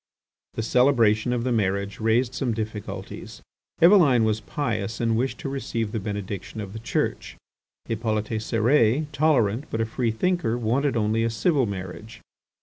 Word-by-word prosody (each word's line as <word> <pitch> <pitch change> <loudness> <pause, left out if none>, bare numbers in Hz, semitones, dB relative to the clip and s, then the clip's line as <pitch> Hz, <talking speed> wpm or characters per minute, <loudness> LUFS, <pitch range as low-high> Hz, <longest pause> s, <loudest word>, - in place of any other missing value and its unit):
The 115 - -2
celebration 120 -2 +3
of 120 -1 -1
the 130 - -1
marriage 100 -2 -1
raised 115 +3 +1
some 125 -3 -1
difficulties. 110 -1 -6 0.4
Eveline 165 - +6
was 110 0 0
pious 110 -4 -3
and 115 -1 +1
wished 130 +4 -1
to - - -4
receive 115 -5 -3
the 110 - -2
benediction 100 0 -5
of 100 -2 -6
the 110 - -6
Church. 115 - -2 0.5
Hippolyte 110 -1 -2
Cérès, 115 +4 +2
tolerant 140 -5 +2
but 115 - -3
a 115 - +1
free 115 +1 -1
thinker, 140 0 0
wanted 125 +4 0
only 110 +1 +1
a 115 - +1
civil 125 +4 +1
marriage. 100 +3 -7
115 Hz, 150 wpm, -25 LUFS, 110-125 Hz, 0.5 s, Eveline